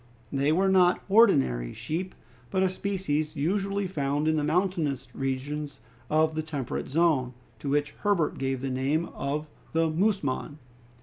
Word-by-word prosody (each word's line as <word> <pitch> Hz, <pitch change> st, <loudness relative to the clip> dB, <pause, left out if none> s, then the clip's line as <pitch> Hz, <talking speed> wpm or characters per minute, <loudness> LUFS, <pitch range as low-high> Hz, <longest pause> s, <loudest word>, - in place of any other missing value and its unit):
They 140 Hz, +2 st, +2 dB
were 190 Hz, +5 st, +3 dB
not 185 Hz, -2 st, +4 dB
ordinary 65 Hz, -, +4 dB
sheep, 180 Hz, +4 st, -4 dB, 0.3 s
but 190 Hz, +6 st, +1 dB
a 190 Hz, -, +3 dB
species 180 Hz, -6 st, -2 dB
usually 195 Hz, +6 st, 0 dB
found 145 Hz, -3 st, -1 dB
in 160 Hz, -, +3 dB
the 150 Hz, -, 0 dB
mountainous 165 Hz, -3 st, 0 dB
regions 140 Hz, +2 st, -3 dB, 0.3 s
of 155 Hz, +1 st, +3 dB
the 155 Hz, -, -1 dB
temperate 145 Hz, -5 st, -4 dB
zone, 140 Hz, -5 st, +2 dB, 0.2 s
to 140 Hz, -, -4 dB
which 145 Hz, +1 st, +1 dB
Herbert 200 Hz, -7 st, +1 dB
gave 135 Hz, -1 st, -1 dB
the 135 Hz, -1 st, -2 dB
name 140 Hz, +6 st, 0 dB
of 150 Hz, +2 st, -2 dB, 0.3 s
the 165 Hz, 0 st, +2 dB
musmon. 155 Hz, -6 st, 0 dB
155 Hz, 145 wpm, -27 LUFS, 140-185 Hz, 0.3 s, not